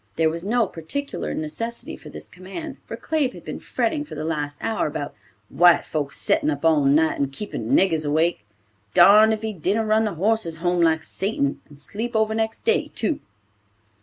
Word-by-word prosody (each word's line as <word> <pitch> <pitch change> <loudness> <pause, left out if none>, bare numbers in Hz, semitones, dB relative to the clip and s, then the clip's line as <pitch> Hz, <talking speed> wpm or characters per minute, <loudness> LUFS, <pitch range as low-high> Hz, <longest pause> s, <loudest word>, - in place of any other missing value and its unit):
There 160 -1 +2
was 165 +1 -5
no 230 +3 +2
particular 200 - -4
necessity 230 +10 -5
for - - -12
this - - -9
command, 190 - -8
for - - -6
Claib 300 -5 -1
had - - -12
been - - -5
fretting 310 -3 -1
for 300 - -10
the 155 - -4
last 145 -2 -3
hour 225 -6 -1
about 145 -1 -5 0.3
"White 175 +7 +5
folks 145 -3 -3
settin' - - +1
up 145 +1 -2
all 155 -3 +4
night 155 +3 +3
and 140 -1 0
keepin' 210 +9 -5
niggers 165 - +3
awake. 155 -3 +1 0.5
Darned 210 +5 +8
if 220 0 -2
he 220 -1 -2
didn't 200 +5 0
run 215 +1 +3
the 210 - -2
horses 195 -2 0
home 175 +1 0
like 160 -1 +3
Satan, 190 -9 -2
and 145 -1 -15
sleep 225 - -5
over 220 0 +2
next 220 0 -2
day, 455 -1 +1
too." 315 - -1
180 Hz, 190 wpm, -23 LUFS, 155-220 Hz, 0.5 s, Darned